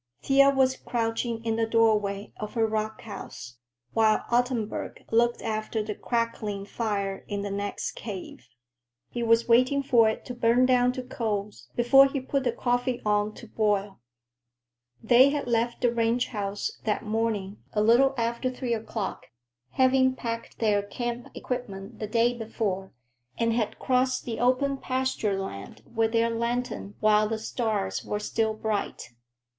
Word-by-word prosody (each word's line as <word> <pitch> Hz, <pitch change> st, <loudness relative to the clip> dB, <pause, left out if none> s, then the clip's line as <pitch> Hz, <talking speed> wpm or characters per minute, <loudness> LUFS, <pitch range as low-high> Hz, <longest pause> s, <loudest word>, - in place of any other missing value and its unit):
Thea 275 Hz, 0 st, +6 dB
was 265 Hz, -1 st, +2 dB
crouching 230 Hz, 0 st, -2 dB
in 225 Hz, -1 st, 0 dB
the 225 Hz, 0 st, +1 dB
doorway 210 Hz, -3 st, +1 dB
of 210 Hz, +2 st, -6 dB
her 225 Hz, -1 st, +3 dB
rock 220 Hz, 0 st, -2 dB
house, 160 Hz, -, -9 dB, 0.4 s
while 220 Hz, -1 st, +3 dB
Ottenburg 240 Hz, -3 st, -1 dB
looked 235 Hz, +1 st, +2 dB
after 215 Hz, 0 st, -2 dB
the 210 Hz, 0 st, -4 dB
crackling 215 Hz, -4 st, -2 dB
fire 200 Hz, -3 st, -2 dB
in 200 Hz, -1 st, -3 dB
the 200 Hz, -, -4 dB
next 200 Hz, 0 st, -3 dB
cave. 190 Hz, -, -8 dB, 0.6 s
He 240 Hz, -, -3 dB
was 230 Hz, 0 st, +3 dB
waiting 255 Hz, +4 st, +4 dB
for 235 Hz, -5 st, +5 dB
it 220 Hz, -, -5 dB
to 250 Hz, -, -5 dB
burn 240 Hz, +1 st, +3 dB
down 250 Hz, -1 st, +4 dB
to 255 Hz, -, -5 dB
coals 210 Hz, -5 st, -4 dB
before 270 Hz, +3 st, +6 dB
he 275 Hz, 0 st, -2 dB
put 265 Hz, +1 st, -2 dB
the 245 Hz, -, +3 dB
coffee 245 Hz, +1 st, 0 dB
on 210 Hz, 0 st, +1 dB
to 235 Hz, -, -11 dB
boil. 205 Hz, -2 st, 0 dB, 1.0 s
They 245 Hz, +4 st, +6 dB
had 290 Hz, 0 st, -2 dB
left 235 Hz, 0 st, 0 dB
the 240 Hz, -1 st, +2 dB
ranch 235 Hz, +1 st, +1 dB
house 200 Hz, -2 st, -3 dB
that 220 Hz, +1 st, -1 dB
morning 215 Hz, -2 st, -1 dB, 0.2 s
a 210 Hz, -, +2 dB
little 255 Hz, +5 st, +5 dB
after 235 Hz, +2 st, 0 dB
three 250 Hz, -1 st, -3 dB
o'clock, 220 Hz, -2 st, -4 dB, 0.5 s
having 260 Hz, 0 st, +4 dB
packed 230 Hz, -2 st, -5 dB
their 210 Hz, -3 st, +2 dB
camp 240 Hz, +4 st, -4 dB
equipment 220 Hz, -4 st, -5 dB
the 215 Hz, -, -3 dB
day 235 Hz, +3 st, +2 dB
before, 210 Hz, -4 st, -3 dB, 0.5 s
and 230 Hz, 0 st, +1 dB
had 225 Hz, -2 st, -1 dB
crossed 255 Hz, 0 st, +1 dB
the 230 Hz, -2 st, -4 dB
open 260 Hz, +3 st, +2 dB
pasture 255 Hz, -7 st, -1 dB
land 100 Hz, -, -7 dB
with 225 Hz, -1 st, +1 dB
their 230 Hz, 0 st, +3 dB
lantern 235 Hz, -3 st, -2 dB
while 215 Hz, 0 st, +4 dB
the 225 Hz, -, -1 dB
stars 220 Hz, -, -2 dB
were 210 Hz, -, -3 dB
still 220 Hz, +1 st, -1 dB
bright. 215 Hz, -, -3 dB
230 Hz, 155 wpm, -27 LUFS, 210-245 Hz, 1.0 s, Thea